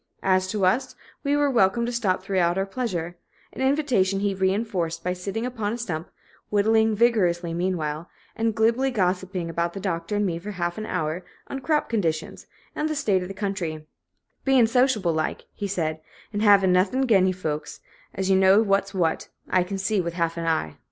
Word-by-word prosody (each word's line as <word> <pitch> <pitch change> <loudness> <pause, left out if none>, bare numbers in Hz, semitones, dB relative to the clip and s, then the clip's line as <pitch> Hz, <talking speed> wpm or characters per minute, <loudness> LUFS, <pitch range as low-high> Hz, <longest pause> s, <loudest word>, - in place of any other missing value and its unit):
As 185 -1 +2
to 195 0 0
us, 190 +9 +1 0.3
we 285 0 +2
were 290 -1 +2
welcome 235 0 +3
to 240 - -2
stop 210 -6 0
throughout 180 -2 +1
our 195 - +1
pleasure, 180 -6 -3 0.4
an - - -6
invitation 260 -9 +2
he 200 0 0
reinforced 190 -3 -1
by 180 - 0
sitting 195 +5 -4
upon 225 -4 -2
a - - -3
stump, 175 -8 -4 0.4
whittling 220 +1 +3
vigorously 180 -7 +2
meanwhile, 170 -3 -2 0.3
and 225 -1 0
glibly 230 +4 +2
gossiping 185 -5 -1
with 170 0 0
the 195 - -5
Doctor 170 0 -2
and 205 0 +1
me 170 -3 -2
for 200 +5 -7
a - - -5
half 175 +1 -2
hour, 180 -5 -2 0.3
on 275 - -4
crop 300 +2 0
conditions 165 -8 -2 0.3
and 310 - -1
the 310 - -1
state 210 -11 +1
of 180 - -5
the 195 - -8
country 185 -6 -3 0.6
"bein' 265 -3 +5
sociable 230 -7 +2
like," 155 0 -2
he 205 - -4
said, 160 -5 -2 0.3
"an' 205 - -1
hav'n' 200 -3 +5
nuth'n 200 +9 +2
'gin 195 -6 +4
you 185 - +1
folks, 155 -4 -4 0.4
as 190 0 0
knows 190 +3 +5
what's 195 0 +1
what, 165 -3 0 0.2
I 185 - +4
kin 195 +2 -4
see 195 +1 0
with 170 -1 -4
half 170 -1 0
a 170 - -4
eye!" 160 - -1
190 Hz, 190 wpm, -25 LUFS, 175-220 Hz, 0.6 s, bein